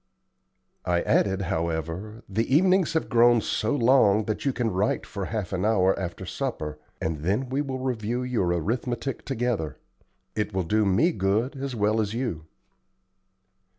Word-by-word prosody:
I 85 -1 +1
added, 95 0 +2
however: 85 +5 -3
"The 110 +5 -1
evenings 185 0 +4
have 160 - 0
grown 120 0 +5
so 110 +3 -1
long 115 -5 +4
that 110 +4 -3
you 140 - +3
can 120 -2 -1
write 95 +4 0
for 100 -3 -5
half 105 -3 -3
an 90 - -1
hour 95 -3 +3
after 95 0 -5
supper, 80 - -4 0.2
and 80 -2 -2
then 105 - -1
we 135 +2 0
will 135 -2 -3
review 125 -2 -2
your 125 -7 0
arithmetic 120 - -2
together. 115 - -2 0.6
It 105 -2 -2
will 95 - +1
do 105 +5 +2
me 110 - +3
good 105 - 0
as 135 -1 -4
well 110 +1 +2
as 105 +1 -3
you." 115 -11 -3
110 Hz, 155 wpm, -26 LUFS, 95-125 Hz, 0.6 s, grown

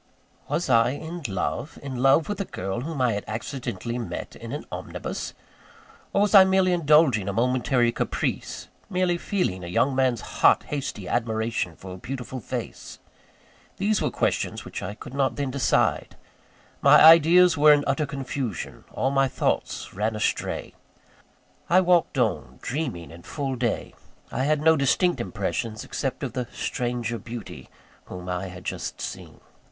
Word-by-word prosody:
Was 160 +5 -1
I 120 0 +4
in 165 +4 -6
love? 110 - -3
in 135 -2 -5
love 135 +5 +4
with 205 -1 -3
a - - -2
girl 95 - -4
whom 155 +1 -5
I 125 -3 +2
had 100 - -3
accidentally 115 0 -4
met 115 - -6
in - - -9
an - - -5
omnibus? - - -5 0.8
Or, 200 - +3
was 210 - 0
I 195 -2 +10
merely 190 -1 +3
indulging 150 - +4
a - - -2
momentary 125 +1 +2
caprice - - -3 0.2
merely 180 -2 +1
feeling 135 - -1
a - - -6
young 130 +10 +1
man's 130 -3 +2 0.2
hot, - - +6
hasty 130 -9 -5
admiration 110 -6 -1
for 95 +2 -9
a - - -8
beautiful 130 +4 -6
face? 110 - -6 0.8
These 205 +1 +1
were - - +1
questions - - -1
which - - -6
I 95 +3 -5
could 110 - -10
not 135 -1 +1
then 140 -2 -2
decide. 135 -2 +1 0.7
My - - +7
ideas 165 +2 +8
were 150 0 +7
in 145 -1 +5
utter 140 +2 0
confusion, 135 - -5
all 135 - 0
my 135 -1 +3
thoughts - - -2
ran 110 +3 -1
astray. 105 - -2 1.0
I 180 +3 +6
walked 175 -5 +2
on, 120 -4 -1
dreaming 115 - -3
in 85 +1 -12
full 135 - -4
day 120 -2 -2 0.4
I 130 - -1
had 150 0 +2
no 160 +1 +5
distinct 140 +1 +2
impressions, 110 0 -3
except 135 0 -3
of 130 - -3
the 125 -2 -3
stranger 120 -1 -3
beauty 115 +1 -9 0.4
whom 90 0 -8
I 90 +1 -2
had 90 0 -10
just - - -4
seen. - - -7
130 Hz, 160 wpm, -25 LUFS, 110-155 Hz, 1.0 s, I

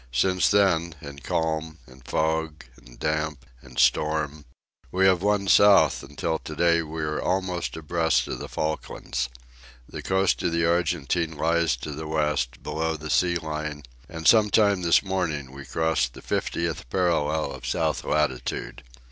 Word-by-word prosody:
Since 90 +9 +2
then, 85 -5 +2
in 70 -1 -9
calm, 80 +1 -2
and 65 0 -17
fog, 80 +2 -1
and - - -17
damp, 75 -4 -2 0.2
and - - -15
storm, 75 -1 +1 0.5
we 95 +1 +2
have 95 -2 +4
won 100 0 +1
south 100 -7 +6
until 80 -1 -3
to 75 - -8
day 85 +1 +3
we 80 0 -5
are 75 0 -2
almost 90 -2 -2
abreast 80 -5 +1
of - - -5
the - - -7
Falklands. 65 -5 -3 0.6
The - - -7
coast 95 0 +1
of 85 - 0
the 85 0 +2
Argentine 85 -1 0
lies 85 -2 +2
to 70 +5 -7
the 75 +2 -6
West, 75 -6 -1
below 80 +1 -2
the 80 0 -6
sea 90 -1 +2
line, 75 -2 -4 0.3
and 80 -2 -3
some 110 -2 +6
time 100 -2 +3
this 85 -1 +4
morning 80 -9 -2
we 70 +1 -10
crossed 80 -6 0
the - - -12
fiftieth 85 -6 -2
parallel 80 -5 0
of - - -8
south - - 0
latitude. 75 -1 -2
80 Hz, 155 wpm, -25 LUFS, 75-85 Hz, 0.6 s, south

